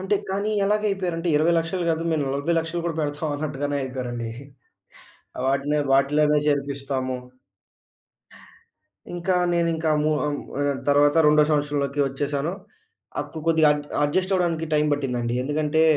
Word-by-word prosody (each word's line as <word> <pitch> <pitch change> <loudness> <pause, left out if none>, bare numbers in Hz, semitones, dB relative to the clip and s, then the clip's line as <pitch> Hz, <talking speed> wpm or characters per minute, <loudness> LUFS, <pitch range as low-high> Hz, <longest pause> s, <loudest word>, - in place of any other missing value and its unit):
అంటే 190 +2 0 0.2
కానీ 200 +2 -1
ఎలాగ 210 +1 +1
అయిపోయారంటే 180 -3 -2
20,00,000 165 +3 +1
గాదు, 165 0 0
మేము 155 - +1
40,00,000 165 +4 -1
గూడా 165 -2 -2
పెడతాం 150 +1 -2
అన్నట్టుగానే 145 -1 -2
అయిపోయారండి. 125 -3 -4 1.2
వాటినే 140 +2 +1
వాటిలోనే 150 +2 +3
చేర్పిస్తాము. 140 -2 -1 2.0
ఇంకా 175 +1 0 0.2
నేనింకా 165 -2 +1
మూ 155 - +2 0.2
అం 145 - -1 0.3
ఆహ్, 145 -1 0
తర్వాత 145 +1 +4
రెండో 150 0 +6
సంవత్సరంలోకి 145 -1 0
వచ్చేసాను. 140 +4 -2 0.7
అప్పుడు 160 - -8
కొద్దిగా 160 -2 +5
అడ్ 145 0 -5 0.2
అడ్జస్ట్ 185 +6 0
అవ్వడానికి 170 -3 0
టైమ్ 150 0 +3
పట్టిందండి. 125 -4 -2
ఎందుకంటే, 150 +2 +1
150 Hz, 120 wpm, -24 LUFS, 140-165 Hz, 2.0 s, రెండో